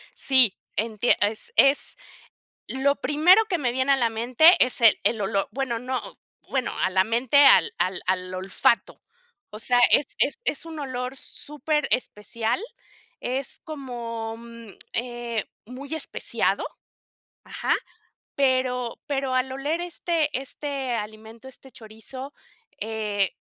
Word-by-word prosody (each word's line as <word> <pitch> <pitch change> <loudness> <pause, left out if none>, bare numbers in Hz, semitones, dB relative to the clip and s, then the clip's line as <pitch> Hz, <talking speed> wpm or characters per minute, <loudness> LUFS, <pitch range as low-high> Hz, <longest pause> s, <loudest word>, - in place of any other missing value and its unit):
Sí, 260 -7 +4 0.2
entie 220 +2 +1
es 210 +1 -1
es 275 +1 +4 0.7
lo 280 +2 +1
primero 335 +10 +4
que 370 -5 -1
me 250 -5 -1
viene 260 +2 +2
a - - +4
la 235 -3 +1
mente 240 +7 +2 0.2
es 250 -1 -3
el 225 -2 +6
el 225 - +2
olor, 195 0 -1
bueno, 255 -4 -2
no, 255 +1 -5 0.3
bueno, 260 -2 -1
a 185 - +1
la 190 0 +3
mente 250 +5 +4
al 450 +10 +6
al 185 0 0
al 185 0 -1
olfato. 190 +5 0 0.5
O 210 - -9
sea, 245 +2 +2
es 285 - +4
es 285 - +3
es 300 - -1
un 325 -2 -8
olor 255 -1 -4
súper 300 +2 -3
especial, 230 - -1 0.6
es 260 +2 -3
como, 235 -7 -6
mm, 230 -1 -12 0.2
eh, 240 -2 -3 0.2
muy 275 +5 -9
especiado, 320 - -1 0.8
ajá, - - -1 0.6
pero 255 -3 0
pero 270 -3 -1
al 255 +1 0
oler 290 +5 -2
este 335 -3 -1
este 275 -1 -4
alimento, 220 +3 -7
este 265 +1 -12
chorizo, 250 +5 -10 0.5
eh, 210 -3 -2
250 Hz, 135 wpm, -24 LUFS, 225-275 Hz, 0.8 s, el